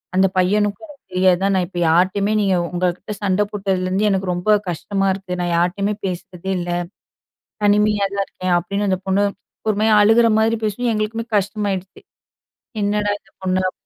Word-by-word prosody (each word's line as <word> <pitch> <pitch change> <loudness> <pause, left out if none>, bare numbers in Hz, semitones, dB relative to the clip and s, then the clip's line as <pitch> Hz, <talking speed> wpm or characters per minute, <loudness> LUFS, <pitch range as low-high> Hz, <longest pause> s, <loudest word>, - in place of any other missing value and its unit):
அந்த 190 +1 +5
பையனுக்கும் 205 - +1 0.2
தெரியாதுதான் 185 +1 +3
நான் 185 - +1
இப்ப 175 -1 -6
யார்ட்டயுமே 185 +5 +2
நீங்க 195 -2 +2 0.2
உங்ககிட்ட 180 +3 -2
சண்ட 195 +1 +2
போட்டதுலருந்து 195 0 0
எனக்கு 190 -1 0
ரொம்ப 180 +4 0 0.2
கஷ்டமா 195 +3 -1
இருக்கு. 190 -2 -5
நான் 175 -1 -1
யார்ட்டயுமே 195 +4 0
பேசுறதே 180 0 -5
இல்ல. 175 0 -3 0.9
தனிமையா 205 0 +3
தான் 200 0 0
இருக்கேன்" 185 -1 -2
அப்படின்னு 200 +4 -2
அந்த 185 -1 +1
பொண்ணு 195 +2 +2 0.4
ஒருமாரி 215 +1 +2
அழுகுற 225 +3 +5
மாரி 225 +1 +2
பேசுவும். 225 +3 -1
எங்களுக்குமே 220 +2 -2
கஷ்டமாயிடுச்சு. 195 -2 -2 0.8
என்னடா 205 0 +1
இந்த 195 - -29
பொண்ணு 185 0 0
அப் - - -12
195 Hz, 145 wpm, -20 LUFS, 185-210 Hz, 0.9 s, அந்த